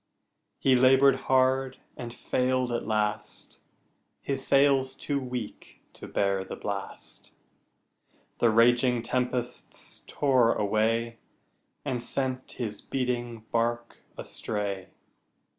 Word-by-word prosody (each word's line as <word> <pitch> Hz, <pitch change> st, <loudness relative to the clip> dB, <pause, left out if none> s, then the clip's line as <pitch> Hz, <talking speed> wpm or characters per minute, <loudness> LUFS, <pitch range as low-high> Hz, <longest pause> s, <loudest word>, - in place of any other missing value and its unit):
He 130 Hz, -1 st, +3 dB
labored 130 Hz, +2 st, +6 dB
hard 130 Hz, 0 st, +3 dB, 0.2 s
and 120 Hz, -1 st, -6 dB
failed 125 Hz, +1 st, 0 dB
at 120 Hz, -, -2 dB
last, 105 Hz, -1 st, -2 dB, 0.6 s
His 135 Hz, -1 st, -2 dB
sails 135 Hz, -1 st, +3 dB
too 145 Hz, -1 st, -2 dB
weak 125 Hz, -4 st, -7 dB
to -, -, -10 dB
bear 100 Hz, -1 st, 0 dB
the -, -, -7 dB
blast, 100 Hz, -1 st, -6 dB, 1.1 s
The 120 Hz, -, +4 dB
raging 120 Hz, +2 st, +4 dB
tempests 125 Hz, 0 st, -3 dB
tore 130 Hz, -5 st, +3 dB
away 115 Hz, +2 st, 0 dB, 0.7 s
And 125 Hz, -2 st, -1 dB
sent 130 Hz, +1 st, -2 dB
his 105 Hz, -4 st, -4 dB
beating 120 Hz, -3 st, -2 dB
bark 120 Hz, 0 st, -1 dB, 0.2 s
astray. 100 Hz, -3 st, -4 dB
120 Hz, 100 wpm, -28 LUFS, 115-130 Hz, 1.1 s, labored